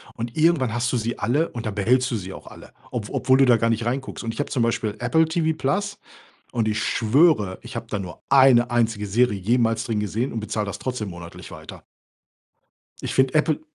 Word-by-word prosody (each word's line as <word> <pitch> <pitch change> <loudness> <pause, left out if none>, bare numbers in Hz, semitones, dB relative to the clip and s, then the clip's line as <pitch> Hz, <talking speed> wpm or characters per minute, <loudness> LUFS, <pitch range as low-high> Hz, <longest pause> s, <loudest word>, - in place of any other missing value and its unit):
Und 115 0 -5
irgendwann 155 -7 +3
hast 120 +1 0
du 125 - +1
sie 115 +1 -3
alle. 135 - +1
Und 115 -1 -7
dann 105 -2 -3
behältst 125 +5 +2
du - - 0
sie 95 -1 -7
auch - - -12
alle, - - -13 0.2
ob 115 -5 -4
obwohl 130 -1 +3
du 135 - +5
da 125 -2 +5
gar 115 +1 +1
nicht 115 0 0
reinguckst. 130 +2 -3
Und 115 - -2
ich - - -10
habe - - -4
zum 130 - 0
Beispiel 115 -2 -1
Apple 160 0 +3
TV+. 160 +5 -1 0.5
Und 115 -2 0
ich 105 0 -1
schwöre, 115 - +2
ich 120 +1 -9
habe 115 0 -5
da 105 - -1
nur 90 -3 -8
eine 130 -3 +6
einzige 115 -3 0
Serie 110 +1 +2
jemals 115 +2 +1
drin 110 -3 -1
gesehen 110 +5 -2
und 115 - -3
bezahle 105 0 -3
das 100 - -5
trotzdem 125 -6 -4
monatlich 85 -1 -10
weiter. - - -11 1.2
Ich - - -3
finde 130 0 +2
Apple 155 0 +2
120 Hz, 215 wpm, -23 LUFS, 110-130 Hz, 1.2 s, eine